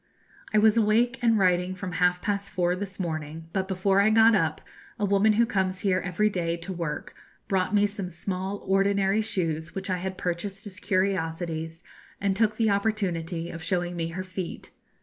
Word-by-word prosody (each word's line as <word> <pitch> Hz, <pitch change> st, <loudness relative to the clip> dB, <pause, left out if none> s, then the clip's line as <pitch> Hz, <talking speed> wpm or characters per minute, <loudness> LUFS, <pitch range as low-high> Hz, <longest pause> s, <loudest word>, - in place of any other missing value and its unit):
I 215 Hz, -, +2 dB
was 215 Hz, +1 st, +5 dB
awake 230 Hz, +3 st, +3 dB
and 230 Hz, -2 st, +4 dB
writing 180 Hz, -1 st, +2 dB
from 185 Hz, 0 st, -5 dB
half 180 Hz, +1 st, +1 dB
past 200 Hz, -1 st, -1 dB
four 180 Hz, -2 st, +1 dB
this 195 Hz, 0 st, -6 dB
morning, 160 Hz, -2 st, -4 dB
but 190 Hz, -1 st, -1 dB
before 195 Hz, +1 st, +2 dB
I 210 Hz, -, +4 dB
got 225 Hz, +1 st, +6 dB
up, 160 Hz, -6 st, +1 dB, 0.4 s
a 210 Hz, -, 0 dB
woman 200 Hz, +2 st, +4 dB
who 230 Hz, +3 st, +4 dB
comes 190 Hz, -4 st, -1 dB
here 190 Hz, -2 st, +2 dB
every 185 Hz, +4 st, 0 dB
day 170 Hz, -4 st, -1 dB
to 175 Hz, +3 st, -6 dB
work 165 Hz, -4 st, -4 dB, 0.3 s
brought 190 Hz, +1 st, +1 dB
me 205 Hz, 0 st, +5 dB
some 200 Hz, -3 st, -4 dB
small 190 Hz, +3 st, -4 dB
ordinary 195 Hz, +1 st, +2 dB
shoes 165 Hz, -6 st, -2 dB
which 195 Hz, 0 st, -3 dB
I 185 Hz, -, +1 dB
had 190 Hz, +1 st, -4 dB
purchased 190 Hz, +3 st, -4 dB
as 200 Hz, -1 st, -8 dB
curiosities, 165 Hz, -4 st, -1 dB, 0.4 s
and 195 Hz, -1 st, +1 dB
took 215 Hz, 0 st, +2 dB
the 220 Hz, -2 st, +3 dB
opportunity 180 Hz, -5 st, -1 dB
of 165 Hz, -, -7 dB
showing 175 Hz, 0 st, -1 dB
me 165 Hz, -1 st, -2 dB
her 175 Hz, +3 st, -5 dB
feet. 185 Hz, -1 st, -6 dB
190 Hz, 185 wpm, -27 LUFS, 175-205 Hz, 0.4 s, got